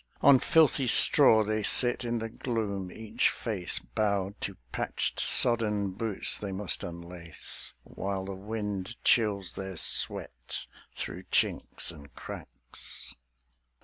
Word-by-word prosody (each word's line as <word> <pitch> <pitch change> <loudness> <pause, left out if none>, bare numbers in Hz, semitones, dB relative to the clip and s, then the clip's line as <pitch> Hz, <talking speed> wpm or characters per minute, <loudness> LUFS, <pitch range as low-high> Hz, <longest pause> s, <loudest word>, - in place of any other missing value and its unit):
On 135 -2 +6
filthy 150 -4 +3
straw 115 -3 +7
they 110 +1 -2
sit 120 +4 +4
in 120 0 -2
the 115 0 -4
gloom, 105 -5 -4
each 110 +3 -1
face 100 -7 -2
Bowed 100 - -2
to - - -4
patched, - - -3
sodden 105 -4 +4
boots 105 +1 -2
they 100 -2 -5
must 95 0 -1
unlace, 85 -1 -4
While 95 -1 -5
the 100 - -6
wind 105 +1 -5
chills 100 -6 +1
their 95 -2 -7
sweat 65 -5 -2 0.3
through 90 +3 -7
chinks - - 0
and 75 -4 -14
cracks. - - -10
100 Hz, 120 wpm, -28 LUFS, 95-115 Hz, 0.3 s, straw